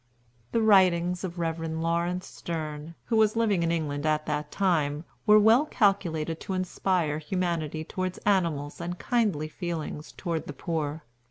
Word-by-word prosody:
The 230 - +2
writings 180 -4 +4
of 180 -2 -4
the 175 - -4
Rev. 165 0 -1
Laurence 170 +3 -1
Sterne, 155 -1 -6
who 230 - +1
was 215 0 +4
living 215 -6 +2
in 165 0 +1
England 145 -4 -2
at 155 0 +1
that 150 -1 -3
time, 160 -5 +1 0.2
were 210 0 +8
well 225 +8 +5
calculated 170 - +1
to 195 - -5
inspire 180 -4 0
humanity 160 -2 -2
toward 185 +2 -3
animals 165 -7 +1
and 175 +1 -4
kindly 205 -12 0
feelings 160 -2 -5
toward 165 -3 -3
the 145 - -5
poor. 155 0 -3
170 Hz, 155 wpm, -27 LUFS, 155-190 Hz, 0.2 s, were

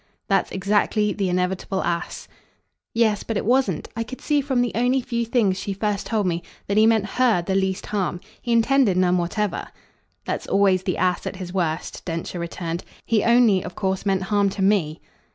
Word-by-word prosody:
"That's - - +2
exactly 205 +2 +1
the 195 -3 -1
inevitable 185 +1 -1
ass." 170 0 -3 0.6
"Yes, 220 -3 +2
but 225 - -3
it - - -2
wasn't 240 - +1
I 230 - -2
could 250 +3 -6
see 295 -1 +1
from 265 -3 0
the 240 - -1
only 250 +3 +2
few 235 -2 -2
things 210 -6 +1
she 200 0 -3
first 205 0 -2
told 215 -3 0
me 170 -1 0 0.2
that 200 - -1
he 215 +1 +6
meant 220 -2 +3
HER 225 -4 +2
the 190 - -2
least 190 0 0
harm. 190 -4 -2 0.2
He 240 - -3
intended 230 -3 +3
none 180 -1 +3
whatever." 185 +2 -2 0.6
"That's - - -3
always 195 -2 +3
the 185 -2 -2
ass 180 0 0
at - - -4
his 185 -1 -7
worst," 165 -4 -2
Densher 170 +1 -4
returned. 170 0 -4 0.2
"He 220 -3 +2
only 235 -5 +4
of 180 - -8
course 190 -2 -1
meant 195 -2 +1
harm 200 0 +2
to 195 0 -3
me." 185 -6 +1
200 Hz, 190 wpm, -23 LUFS, 185-225 Hz, 0.6 s, he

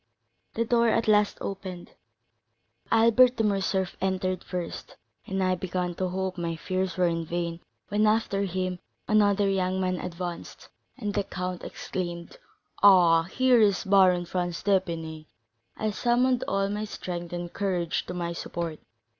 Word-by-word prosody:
The 230 - 0
door 235 0 +3
at 230 0 +1
last 210 -1 +3
opened; 190 -3 -6 1.0
Albert 230 +3 +5
de 225 - 0
Morcerf 195 -2 0
entered 185 -1 -1
first, 180 -2 -6 0.3
and 190 0 -1
I 185 0 +2
began 180 0 -2
to 185 +2 -2
hope 185 0 -3
my 170 -1 -2
fears 185 +2 -2
were 175 -2 +2
vain, 170 0 -3 0.3
when, 210 +1 +2
after 215 -2 +1
him, 185 -1 -2 0.3
another 205 -1 +3
young 190 -1 0
man 185 -1 -1
advanced, 175 0 -6 0.3
and 210 -5 -3
the 205 - 0
count 180 -1 -5
exclaimed: 175 - -5 0.4
'Ah, 175 -5 +7
here 250 +5 +3
is 200 -3 +3
the 195 - -7
Baron 185 -3 +5
Franz 175 -1 -3
d'Épinay!' 165 -5 -1 0.5
I 215 0 -1
summoned 245 +3 +2
all 195 0 +1
my 210 +1 -3
strength 175 -4 -6
and 175 -1 -5
courage 180 -4 -1
to 180 - -5
my 170 -1 -3
support. 170 -2 -5
185 Hz, 145 wpm, -27 LUFS, 175-205 Hz, 1.0 s, Ah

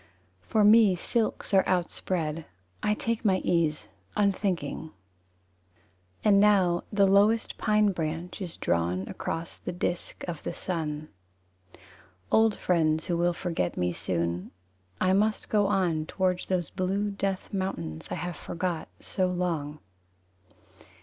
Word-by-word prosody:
For 215 - +1
me 210 -2 +7
silks 220 +4 -1
are 190 - +6
outspread. 170 -3 -1 0.4
I 210 - +1
take 230 +1 -2
my 195 -4 +3
ease, 165 -3 +1 0.3
unthinking. 195 -5 0
V - - -16 1.3
And 200 -2 +5
now 190 -4 +4
the 200 -2 +4
lowest 205 +4 +3
pine 210 -1 +3
branch 165 +2 -4
Is 175 -3 -4
drawn 85 +3 0
across 165 +1 -4
the - - -5
disk 175 0 -3
of 165 -3 -5
the - - -5
sun. 155 -4 -3 1.2
Old 220 -1 +4
friends 160 -3 +1
who 175 - 0
will 175 +1 +2
forget 170 - -2
me 90 0 0
soon 85 0 -2 0.5
I 185 0 +3
must 210 +2 +1
go 205 -2 +3
on, 175 -6 +1
Towards 185 -2 -1
those 180 -5 -1
blue 195 +2 -1
death 195 -1 -3
mountains 85 - -3
I - - -2
have 175 -1 -4
forgot 170 -1 -3
so 185 -1 0
long. 170 -5 -2
180 Hz, 130 wpm, -28 LUFS, 160-200 Hz, 1.3 s, me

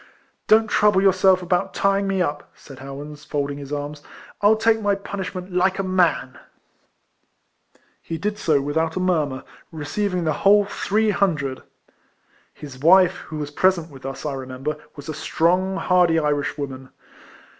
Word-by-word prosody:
"Don't 220 +1 +5
trouble 210 -2 +3
yourselves 190 -1 +4
about 180 +2 -1
tying 195 0 +1
me 190 -2 +1
up," 145 -2 -4
said 135 - -14
Howans, 145 +2 -9
folding 145 -1 -3
his 140 0 -9
arms; 145 0 -5 0.4
"I'll 205 +2 +5
take 225 0 +2
my 205 -1 +1
punishment 190 -2 -6
like 185 +1 +2
a 195 - -1
man! 180 -8 0 0.8
" - - -40
He 165 - -5
did 210 +5 -3
so 150 -7 +2
without 160 +3 -1
a - - -1
murmur, 155 -8 0 0.3
receiving 180 +4 -2
the 155 -1 +1
whole 205 +1 +5
three 210 +2 0
hundred. 155 -10 -1 0.9
His 140 -4 -11
wife, 180 +4 +5
who 155 - -5
was 145 -1 -5
])resent 175 -4 +3
with 135 -2 -13
us, 135 +2 -7
I 145 - -2
remember, 135 +3 -5 0.2
was 145 -2 -10
a 155 - -4
strong, 180 +5 0
hardy 180 -3 +3
Irishwoman. 145 -3 -2
170 Hz, 155 wpm, -22 LUFS, 145-190 Hz, 0.9 s, Don't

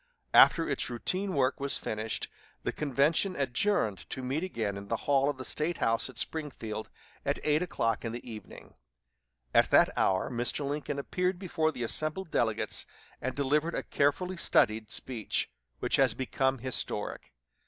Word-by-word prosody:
After 165 - +7
its 140 -4 -1
routine 185 +11 -1
work 130 -1 +2
was 140 0 0
finished, 110 +1 -3 0.4
the - - 0
convention 150 +6 +2
adjourned 130 - 0
to 130 - -4
meet 135 +6 -1
again 110 - -2
in 100 0 -7
the 115 - 0
hall 140 0 +3
of 145 - -2
the 130 - -7
State 155 +2 -1
House 115 +3 +1
at 130 - -11
Springfield 120 -9 -4 0.3
at - - 0
eight 150 +1 +3
o'clock 115 -10 -1
in 115 - -2
the 120 +1 -7
evening. 110 -2 -10 0.8
At - - +5
that - - +5
hour 95 +6 +1
Mr. 120 +4 -1
Lincoln 145 0 -3
appeared 180 +6 -1
before 160 -4 0
the 125 -5 -5
assembled 155 +8 -2
delegates 110 -2 +1 0.3
and 130 0 -2
delivered 150 +4 +1
a - - -1
carefully 180 +6 0
studied 110 -8 +2
speech, 120 -5 0 0.3
which - - +2
has 130 -5 +4
become 130 +1 0
historic. 130 +1 -3
135 Hz, 160 wpm, -30 LUFS, 115-155 Hz, 0.8 s, After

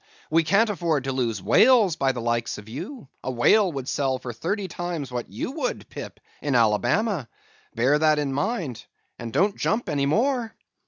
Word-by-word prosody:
We 165 +1 +4
can't 200 +7 +3
afford 165 -7 0
to 135 - -2
lose 115 -7 -1
whales 225 -8 +5
by 135 -3 +1
the 125 -2 -5
likes 120 0 -1
of 105 - -11
you; 145 - -7 0.2
a - - -3
whale 180 - +4
would 135 -4 -5
sell 135 -3 0
for 125 -1 -7
thirty 190 - -2
times 170 -6 -4
what 120 -1 -4
you 105 - -4
would, 275 -4 -3
Pip, - - -8 0.2
in 145 -3 0
Alabama. 120 - +2 0.5
Bear 135 +6 +3
that 155 -1 +4
in 145 -2 -1
mind, 145 - -2 0.3
and 115 -1 -6
don't 200 - +2
jump 225 +3 -1
any 140 -1 0
more." 235 - 0
145 Hz, 180 wpm, -25 LUFS, 125-205 Hz, 0.5 s, whales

